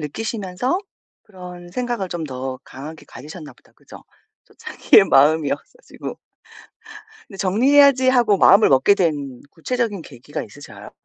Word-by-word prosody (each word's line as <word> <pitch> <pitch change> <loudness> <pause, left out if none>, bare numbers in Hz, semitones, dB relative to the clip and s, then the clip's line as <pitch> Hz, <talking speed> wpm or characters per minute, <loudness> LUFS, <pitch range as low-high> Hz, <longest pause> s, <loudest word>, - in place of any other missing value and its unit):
느끼시면서 210 - -3 0.4
그런 180 -4 -12
생각을 240 -2 -4
좀 170 -2 -5
더 130 -2 -6
강하게 150 +4 -11
가지셨나 155 +2 -11
보다. - - -28
그죠? - - -16 0.4
또 - - -25
자기의 - - +3
마음이 150 +2 +3
없어지고. - - -8 1.1
근데 195 - -14
'정리해야지.' 260 +7 +4
하고 240 -5 +3
마음을 200 +3 +5
먹게 135 +9 +4
된 145 -9 -2
구체적인 220 +1 -3
계기가 145 +2 -8
있으셔요? 145 - -13
180 Hz, 325 characters per minute, -20 LUFS, 145-230 Hz, 1.1 s, 마음을